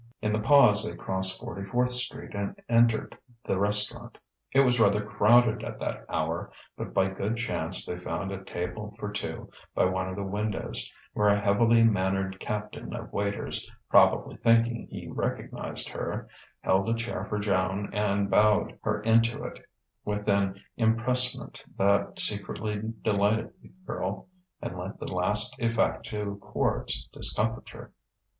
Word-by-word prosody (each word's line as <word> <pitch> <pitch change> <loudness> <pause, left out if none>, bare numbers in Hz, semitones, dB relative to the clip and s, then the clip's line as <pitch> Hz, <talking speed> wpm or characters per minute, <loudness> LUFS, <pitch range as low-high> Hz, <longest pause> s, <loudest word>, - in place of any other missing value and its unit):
In 105 -1 0
the 110 - +1
pause 110 -3 +6
they 110 - -3
crossed 95 0 0
Forty 115 -5 -6
fourth 125 +5 +1
Street 125 0 -3
and 100 -1 -4
entered 115 -1 +3 0.3
the 95 - 0
restaurant. 105 +1 -1 0.3
It 135 - +5
was 125 -2 +3
rather 105 -1 +4
crowded 110 +2 +4
at - - -6
that - - -4
hour, - - -2 0.2
but - - -6
by 95 - +3
good 100 +4 -2
chance 115 - +2
they 90 - -4
found 95 +2 -3
a 95 0 -6
table 95 +4 -5
for 105 - -4
two 105 - -5 0.2
by - - +4
one 95 0 0
of 95 - -5
the 100 - -3
windows; 105 +1 -3 0.2
where 105 - +2
a 100 0 +4
heavily 115 +3 +4
mannered 95 -2 +1
captain 105 0 -5
of - - -8
waiters, 100 0 -2 0.2
probably - - +5
thinking 115 0 +3
he - - -7
recognized - - -4
her, - - -4 0.3
held 95 +3 +2
a 115 - +2
chair 115 +1 -3
for 105 - -3
Joan 100 -1 0
and 100 -1 +1
bowed 105 +1 +3
her 105 -1 -1
into 115 +1 +3
it - - -7 0.4
with 105 0 -3
an 100 -1 +2 0.2
empressement 120 +3 +1
that 100 +1 +2
secretly 105 0 -1 0.2
delighted 105 +1 +1
the - - -16 0.2
girl - - -4 0.3
and 90 - -5
lent 95 +3 -6
the - - -5
last 105 +6 0
effect 115 -1 +1
to 105 -2 -4
Quard's - - -1
discomfiture. 110 +1 -4
105 Hz, 150 wpm, -28 LUFS, 100-115 Hz, 0.4 s, pause